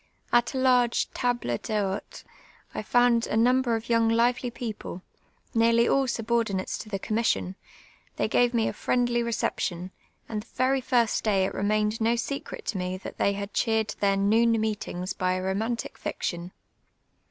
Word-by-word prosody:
At 240 Hz, +3 st, +3 dB
a -, -, 0 dB
larj^e 250 Hz, -2 st, +2 dB
table 240 Hz, -, -1 dB
dlu'ite 205 Hz, -3 st, -3 dB, 0.5 s
1 -, -, -5 dB
found 245 Hz, -1 st, +3 dB
a -, -, -1 dB
number 245 Hz, +1 st, +3 dB
of 225 Hz, -, -3 dB
younj; 230 Hz, -1 st, +2 dB
lively 240 Hz, +2 st, +2 dB
people, 220 Hz, -6 st, -6 dB, 0.5 s
nearly 230 Hz, 0 st, +4 dB
all 270 Hz, -1 st, +2 dB
sul>ordinatc§ 225 Hz, -5 st, -1 dB
to 215 Hz, -, -8 dB
the 200 Hz, -, -2 dB
commission; 215 Hz, -2 st, 0 dB, 0.6 s
they -, -, 0 dB
fj^ave 245 Hz, -1 st, +3 dB
me 225 Hz, -1 st, +2 dB
a -, -, -2 dB
friendly 240 Hz, -1 st, +1 dB
reee])tion, 185 Hz, -6 st, -2 dB, 0.4 s
and 215 Hz, -2 st, -3 dB
the -, -, -17 dB
very 260 Hz, +1 st, +2 dB
tirst 240 Hz, -3 st, +2 dB
day 195 Hz, -3 st, +2 dB
it -, -, -3 dB
remained 210 Hz, +2 st, 0 dB
no 230 Hz, +2 st, +3 dB
secret 275 Hz, +4 st, -5 dB
to 200 Hz, -, -2 dB
me 180 Hz, +1 st, -3 dB
that 185 Hz, -, -9 dB
tlu -, -, +2 dB
y 200 Hz, -, +4 dB
had 200 Hz, +1 st, -5 dB
cheered 220 Hz, -2 st, +1 dB
their 200 Hz, -1 st, +2 dB
noon 225 Hz, +4 st, +3 dB
meetiuf^s 210 Hz, -4 st, -3 dB
by 185 Hz, 0 st, 0 dB
a 185 Hz, 0 st, -2 dB
romantic 220 Hz, +5 st, -2 dB
fiction. 175 Hz, 0 st, -4 dB
225 Hz, 165 wpm, -27 LUFS, 200-240 Hz, 0.6 s, nearly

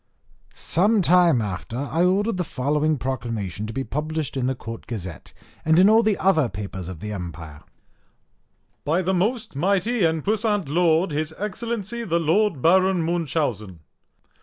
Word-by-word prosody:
_ -, -, -20 dB
Some 205 Hz, +4 st, +2 dB
time 170 Hz, -8 st, +4 dB
after 105 Hz, +3 st, -5 dB
I 145 Hz, +5 st, 0 dB
ordered 200 Hz, +3 st, +1 dB
the 180 Hz, -, 0 dB
following 150 Hz, +1 st, 0 dB
proclamation 115 Hz, -7 st, -4 dB
to 110 Hz, -, -6 dB
be 135 Hz, -, -2 dB
published 150 Hz, +1 st, -3 dB
in 130 Hz, -2 st, 0 dB
the 130 Hz, -, -1 dB
Court 115 Hz, -2 st, -9 dB
Gazette, 95 Hz, -, -7 dB, 0.3 s
and 160 Hz, 0 st, +3 dB
in 190 Hz, +4 st, +6 dB
all 225 Hz, +1 st, +6 dB
the 215 Hz, -3 st, +1 dB
other 160 Hz, -9 st, +2 dB
papers 95 Hz, -2 st, -6 dB
of 90 Hz, -4 st, -9 dB
the 105 Hz, -, -5 dB
empire: 85 Hz, -6 st, -7 dB, 1.2 s
BY 165 Hz, +6 st, +1 dB
THE 190 Hz, +2 st, 0 dB
MOST 210 Hz, -, -1 dB
MIGHTY 200 Hz, -, +1 dB
AND 160 Hz, -2 st, +1 dB
PUISSANT 210 Hz, -4 st, 0 dB
LORD, 165 Hz, +2 st, +2 dB
HIS 155 Hz, +2 st, -3 dB
EXCELLENCY 230 Hz, +2 st, -4 dB
THE 170 Hz, -4 st, +1 dB
LORD 165 Hz, -2 st, +1 dB
BARON 185 Hz, +1 st, +4 dB
MUNCHAUSEN. 140 Hz, -, -2 dB
160 Hz, 160 wpm, -23 LUFS, 120-190 Hz, 1.2 s, in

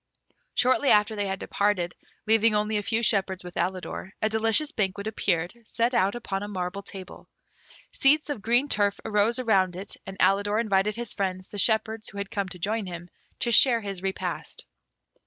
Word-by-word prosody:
Shortly 255 Hz, +3 st, +3 dB
after 210 Hz, +1 st, +4 dB
they 205 Hz, -1 st, -1 dB
had 190 Hz, 0 st, -2 dB
departed, 190 Hz, -3 st, 0 dB, 0.3 s
leaving 225 Hz, 0 st, +4 dB
only 210 Hz, +1 st, 0 dB
a -, -, 0 dB
few 225 Hz, +3 st, -1 dB
shepherds 195 Hz, -4 st, 0 dB
with 180 Hz, 0 st, -9 dB
Alidor, 185 Hz, +1 st, -3 dB
a 215 Hz, -, +1 dB
delicious 225 Hz, +7 st, +2 dB
banquet 200 Hz, -3 st, -2 dB
appeared, 180 Hz, -5 st, -1 dB
set 235 Hz, +2 st, 0 dB
out 195 Hz, -1 st, +2 dB
upon 200 Hz, -5 st, -4 dB
a 205 Hz, -, -4 dB
marble 190 Hz, -1 st, -4 dB
table. 195 Hz, -1 st, -11 dB, 0.6 s
Seats 295 Hz, +2 st, +3 dB
of 235 Hz, -, -4 dB
green 240 Hz, +7 st, +2 dB
turf 205 Hz, -6 st, +2 dB
arose 220 Hz, +2 st, +2 dB
around 195 Hz, -8 st, +2 dB
it, 190 Hz, +2 st, -6 dB
and 195 Hz, 0 st, -7 dB
Alidor 205 Hz, +2 st, +3 dB
invited 210 Hz, -2 st, +1 dB
his 240 Hz, 0 st, -5 dB
friends, 185 Hz, -2 st, -3 dB
the 205 Hz, -, -5 dB
shepherds 220 Hz, +1 st, +1 dB
who 200 Hz, -, -11 dB
had 200 Hz, +1 st, -4 dB
come 200 Hz, -3 st, -2 dB
to 180 Hz, -, -9 dB
join 210 Hz, +3 st, -2 dB
him, 175 Hz, 0 st, -8 dB, 0.3 s
to 235 Hz, -, +1 dB
share 235 Hz, 0 st, +6 dB
his 195 Hz, -3 st, -6 dB
repast. 195 Hz, 0 st, -4 dB
205 Hz, 180 wpm, -26 LUFS, 190-225 Hz, 0.6 s, share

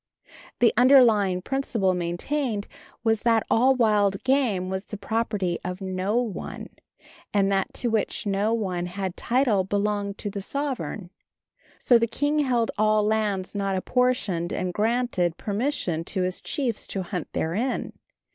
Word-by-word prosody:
The 240 Hz, -, +5 dB
underlying 225 Hz, -8 st, +5 dB
principle 230 Hz, -8 st, 0 dB
maintained 200 Hz, +6 st, -2 dB, 0.4 s
was 225 Hz, -2 st, +2 dB
that 230 Hz, -2 st, +2 dB
all 260 Hz, +4 st, +4 dB
wild 210 Hz, -5 st, +2 dB
game 250 Hz, -9 st, +1 dB
was 190 Hz, +1 st, -4 dB
the 210 Hz, -, -7 dB
property 205 Hz, -4 st, -1 dB
of 180 Hz, 0 st, -4 dB
no 190 Hz, +2 st, -2 dB
one, 240 Hz, -5 st, -4 dB, 0.6 s
and 200 Hz, -1 st, +2 dB
that 195 Hz, -1 st, 0 dB
to 240 Hz, -, -1 dB
which 220 Hz, -1 st, -1 dB
no 200 Hz, +2 st, +1 dB
one 185 Hz, -6 st, -1 dB
had 185 Hz, 0 st, -4 dB
title 240 Hz, -6 st, +2 dB
belonged 205 Hz, +1 st, -1 dB
to 205 Hz, -, -4 dB
the 200 Hz, -, -5 dB
sovereign. 255 Hz, -7 st, -4 dB, 0.7 s
So 240 Hz, -2 st, +4 dB
the 230 Hz, -, +1 dB
king 290 Hz, +6 st, 0 dB
held 245 Hz, -5 st, +1 dB
all 215 Hz, 0 st, +3 dB
lands 210 Hz, -3 st, 0 dB
not 195 Hz, -1 st, -1 dB
apportioned, 200 Hz, -5 st, 0 dB
and 180 Hz, -1 st, -2 dB
granted 215 Hz, -6 st, 0 dB
permission 205 Hz, -, -1 dB
to 185 Hz, 0 st, -1 dB
his 180 Hz, 0 st, -2 dB
chiefs 245 Hz, -7 st, -2 dB
to 195 Hz, -, -3 dB
hunt 180 Hz, -2 st, -5 dB
therein. 215 Hz, +11 st, -2 dB
210 Hz, 145 wpm, -25 LUFS, 190-240 Hz, 0.7 s, The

